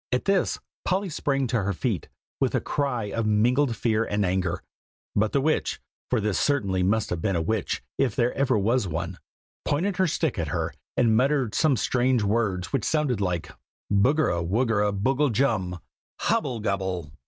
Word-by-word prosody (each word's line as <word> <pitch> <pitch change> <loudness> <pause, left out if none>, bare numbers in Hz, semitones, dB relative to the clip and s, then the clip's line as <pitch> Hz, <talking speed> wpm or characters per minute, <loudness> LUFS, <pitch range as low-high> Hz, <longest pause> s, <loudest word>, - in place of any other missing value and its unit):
At 125 - 0
this 195 -2 +2 0.3
Polly 190 +1 0
sprang 140 -3 0
to 115 -2 0
her 100 +1 -1
feet, 100 - -2 0.3
with - - +1
a - - +3
cry 125 -8 -2
of 115 0 -1
mingled 120 +5 +3
fear 110 -1 +1
and 105 -2 0
anger; 90 -1 -1 0.5
but 105 +1 +2
the 140 - +2
witch 155 +2 0 0.3
(for 125 - +2
this 105 -2 0
certainly 100 -10 +1
must 100 +4 +1
have 85 -2 -2
been 95 -1 0
a 85 - +1
witch, 110 +3 -1 0.2
if 135 -5 +1
ever 120 0 +2
there 135 -4 +2
was 110 +2 +1
one,) 85 +2 -4 0.4
pointed 180 +6 0
her 185 - +3
stick 155 - -1
at 80 - -1
her, - - -2 0.2
and 115 -3 +4
muttered 130 -2 +2
some 150 -5 +3
strange 125 -1 +2
words 100 -4 0
which 135 -6 +1
sounded 145 -9 0
like 90 -4 -2 0.4
"Buggara 100 - +3
wuggera 105 +2 +1
boogle 130 +8 +1
jum, 105 -8 0 0.4
Hobble 120 -3 0
gobble!" 95 -6 -2
110 Hz, 175 wpm, -26 LUFS, 95-135 Hz, 0.5 s, and